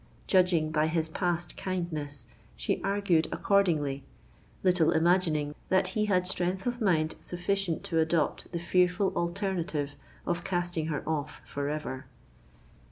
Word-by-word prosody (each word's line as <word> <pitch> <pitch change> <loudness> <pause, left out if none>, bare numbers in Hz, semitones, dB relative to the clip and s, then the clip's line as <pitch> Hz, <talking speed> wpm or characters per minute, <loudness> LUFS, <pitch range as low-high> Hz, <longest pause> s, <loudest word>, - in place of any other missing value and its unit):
Judging 180 -5 +3
by 155 0 +2
his 160 0 0
past 175 0 -1
kindness, 160 -6 -3 0.3
she - - -1
argued 195 -5 +2
accordingly—little 165 0 0
imagining 160 -3 +2 0.2
that 190 0 +3
he 210 +2 0
had 185 -3 +2
strength 185 +1 -1
of 245 0 -2
mind 160 -6 +2
sufficient 180 -1 -1
to 165 - 0
adopt 160 -1 0
the 175 - -2
fearful 180 +2 +2
alternative 170 -5 -1 0.3
of 175 0 -1
casting 175 -3 -1
her 150 -3 -3
off 150 -2 -2
for 140 0 -3
ever! 150 -3 -4
175 Hz, 125 wpm, -29 LUFS, 155-185 Hz, 0.3 s, Judging